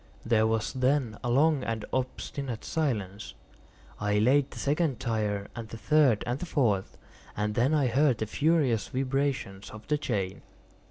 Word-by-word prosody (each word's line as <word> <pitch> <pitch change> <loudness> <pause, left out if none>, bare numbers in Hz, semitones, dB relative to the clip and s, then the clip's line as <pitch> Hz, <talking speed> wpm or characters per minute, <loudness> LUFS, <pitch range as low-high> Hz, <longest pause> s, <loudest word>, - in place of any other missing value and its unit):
There 110 -1 +3
was 110 -1 -1
then 130 -4 +1
a 120 - -1
long 145 +3 +3
and 115 -2 -3
obstinate 130 -1 -3
silence. 110 - -2 0.6
I 105 0 +1
laid 130 +6 +3
the - - -11
second 145 -3 0
tier, 105 -3 -1
and 115 -2 -7
the 115 - -7
third, 140 -4 +3
and 120 +3 -2
the 180 - -5
fourth; 110 -11 0 0.4
and 105 0 0
then 125 +7 +2
I 145 -3 +3
heard 130 +1 +3
the 110 - -2
furious 140 - +1
vibrations 130 -7 -2
of 110 0 -11
the 150 -1 +1
chain. 100 -9 -2
120 Hz, 160 wpm, -28 LUFS, 110-140 Hz, 0.6 s, There